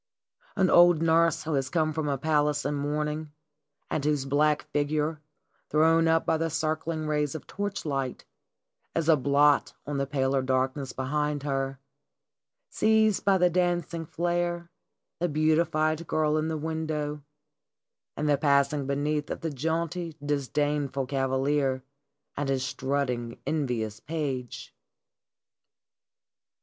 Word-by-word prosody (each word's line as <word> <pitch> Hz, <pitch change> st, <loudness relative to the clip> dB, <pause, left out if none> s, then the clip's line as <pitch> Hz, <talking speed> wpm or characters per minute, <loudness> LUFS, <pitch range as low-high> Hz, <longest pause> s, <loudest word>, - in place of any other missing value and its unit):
An 190 Hz, -2 st, +3 dB
old 175 Hz, -2 st, +6 dB
nurse 165 Hz, 0 st, +3 dB
who 155 Hz, -, -2 dB
has 135 Hz, -2 st, 0 dB
come 155 Hz, -1 st, +1 dB
from 150 Hz, -1 st, -2 dB
a 140 Hz, -, 0 dB
palace 150 Hz, 0 st, +1 dB
in -, -, 0 dB
mourning, 150 Hz, +1 st, -2 dB, 0.5 s
and 145 Hz, -, -2 dB
whose 145 Hz, -2 st, +1 dB
black 150 Hz, +2 st, +2 dB
figure, 150 Hz, +1 st, 0 dB, 0.5 s
thrown 165 Hz, +2 st, +4 dB
up 165 Hz, 0 st, +3 dB
by 160 Hz, -, +2 dB
the 165 Hz, +1 st, -1 dB
circling 155 Hz, 0 st, -2 dB
rays 150 Hz, -1 st, 0 dB
of 160 Hz, -, -7 dB
torchlight, 150 Hz, -10 st, -3 dB, 0.7 s
is 165 Hz, -2 st, 0 dB
a 160 Hz, -, +7 dB
blot 145 Hz, +1 st, +3 dB
on 145 Hz, -1 st, -3 dB
the 140 Hz, -, -1 dB
paler 135 Hz, -1 st, +1 dB
darkness 130 Hz, +1 st, -1 dB
behind 150 Hz, +2 st, -2 dB
her, 135 Hz, -1 st, -2 dB, 0.9 s
sees 220 Hz, -1 st, +3 dB
by 195 Hz, -1 st, +3 dB
the 180 Hz, -1 st, +3 dB
dancing 175 Hz, -2 st, 0 dB
flare 175 Hz, 0 st, -2 dB, 0.5 s
the 175 Hz, +1 st, 0 dB
beatified 155 Hz, +1 st, +1 dB
girl 155 Hz, -1 st, +1 dB
in 155 Hz, 0 st, 0 dB
the 160 Hz, -1 st, -2 dB
window 155 Hz, -1 st, -3 dB, 1.0 s
and 150 Hz, -, -1 dB
the 145 Hz, -1 st, +3 dB
passing 140 Hz, -1 st, +2 dB
beneath 145 Hz, +1 st, -1 dB
of -, -, -4 dB
the 165 Hz, -, -2 dB
jaunty, 165 Hz, +3 st, -2 dB
dis 145 Hz, -2 st, -1 dB
dainful 145 Hz, -2 st, -1 dB
cavalier 135 Hz, 0 st, 0 dB, 0.5 s
and 145 Hz, -1 st, -2 dB
his 135 Hz, -1 st, 0 dB
strutting, 125 Hz, -4 st, -2 dB
envious 120 Hz, -8 st, -2 dB
page. 135 Hz, -3 st, -4 dB
150 Hz, 130 wpm, -27 LUFS, 140-160 Hz, 1.0 s, a